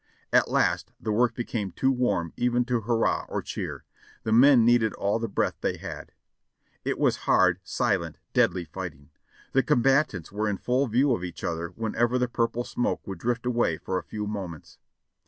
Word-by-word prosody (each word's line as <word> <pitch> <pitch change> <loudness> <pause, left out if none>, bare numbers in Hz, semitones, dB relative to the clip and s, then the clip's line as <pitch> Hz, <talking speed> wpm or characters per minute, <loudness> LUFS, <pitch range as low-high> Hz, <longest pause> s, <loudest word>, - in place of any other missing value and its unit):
At - - +4
last - - +1
the 110 - -3
work 115 +2 +2
became 110 -5 -3
too 135 - +2
warm 100 -10 0
even 120 0 +1
to 120 -2 0
hurrah 115 +1 0
or - - -3
cheer; - - -5 0.4
the 110 - -2
men 125 +1 +7
needed 120 -3 +4
all 100 +3 0
the 115 - -2
breath 100 - -1
they - - -1
had. - - -8 0.7
It - - -1
was - - +2
hard, 90 -1 +4
silent, 90 - -1 0.2
dead - - +3
ly 90 - -3
fighting. 70 -3 -8 0.4
The 135 - +4
combatants 125 - +2
were 105 +1 -1
in 100 - -1
full 130 +6 +1
view 125 +4 +3
of 90 - -2
each 90 -2 -7
other 85 0 -2
when 115 -1 -3
ever 120 +2 +2
the 125 0 +1
purple 120 0 -1
smoke 120 - -2
would 95 -3 -6
drift 120 +4 -1
away 120 -10 +1
for 95 +3 -2
a - - -10
few 105 +4 -5
moments. 95 -7 -7
115 Hz, 190 wpm, -26 LUFS, 95-120 Hz, 0.7 s, men